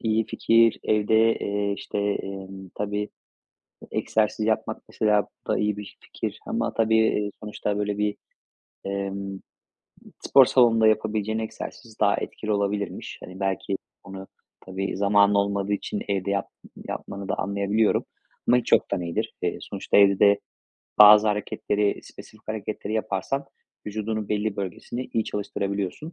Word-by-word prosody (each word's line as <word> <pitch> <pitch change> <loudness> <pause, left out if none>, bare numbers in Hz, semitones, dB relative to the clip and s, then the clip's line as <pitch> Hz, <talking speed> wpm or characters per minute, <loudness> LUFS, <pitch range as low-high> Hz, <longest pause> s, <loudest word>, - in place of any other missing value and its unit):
iyi 110 -1 +1
fikir. 115 0 +3
Evde, 110 +1 +3
eee, 100 0 -1
işte, 100 +1 -5
emm, 95 -1 -4
tabii, 105 0 -2 0.8
egzersiz 110 0 0
yapmak, 110 0 -1
mesela, 105 -2 +2 0.2
bu - - -10
da - - +2
iyi 105 -1 0
bir 105 - -9
fikir. - - -5
Ama, - - -1
tabii, 110 0 +3
eee, 105 -2 +2
sonuçta, 105 -1 -3
böyle, 105 0 -1
bir, 105 0 0 0.7
emm, 100 0 -4 0.8
spor 135 - +6
salonunda 115 -3 +5
yapabileceğin 110 0 +1
egzersiz 110 +1 -7
daha 100 -1 +4
etkili 110 - -4
olabilirmiş. 100 -1 -2
Hani, 90 +1 -10
belki 95 0 -1 0.3
onu, 95 0 -9 0.3
tabii, 95 +1 -4
zamanın 100 0 +4
olmadığı 100 0 +1
için 105 0 -3
evde 100 0 0
yap 100 - -1 0.4
yapmanı 100 0 -6
da - - +1
anlayabiliyorum. 100 +2 +1 0.4
Ama 125 - +6
hiç 125 - -3
yoktan - - +3
iyidir. 85 -1 -3
Eee, - - -1
sonuçta - - -1
evde 100 -1 +6
de 100 0 +6 0.6
bazı 105 +1 +9
hareketleri, 105 0 0
spesifik 110 0 -14
hareketleri 110 -1 -4
yaparsan 110 +5 -2 0.4
vücudunun 110 0 -3
belli 105 0 -1
bölgesini 100 +6 -5
iyi 110 - +1
çalıştırabiliyorsun. 100 - -3
105 Hz, 135 wpm, -25 LUFS, 100-110 Hz, 0.8 s, bazı